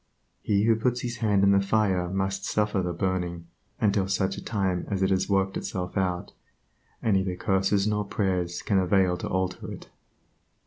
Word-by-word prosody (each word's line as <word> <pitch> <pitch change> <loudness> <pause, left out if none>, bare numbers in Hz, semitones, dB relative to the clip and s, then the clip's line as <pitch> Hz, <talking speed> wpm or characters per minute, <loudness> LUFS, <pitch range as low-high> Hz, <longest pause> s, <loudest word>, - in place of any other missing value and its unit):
He 100 -1 +1
who 115 0 +4
puts 125 +2 0
his 120 0 -4
hand 105 -3 +2
in 100 - +5
the 100 0 +4
fire 100 -3 +1
must 95 +1 -2
suffer 105 -1 0
the 90 -1 -2
burning 85 -1 -2 0.3
until 100 -2 +2
such 95 0 -1
time 95 -5 -1
as 95 -2 0
it 95 - +2
has 95 +1 +1
worked 95 -1 +1
itself 90 -1 -4
out, 90 -3 -1 0.7
and 110 -3 +3
neither 95 -1 -1
curses 95 +2 +1
nor 105 -1 0
prayers 90 -4 -1
can 100 -2 +2
avail 95 -1 +3
to - - -5
alter 95 -1 -2
it. - - -10
95 Hz, 175 wpm, -26 LUFS, 95-100 Hz, 0.7 s, in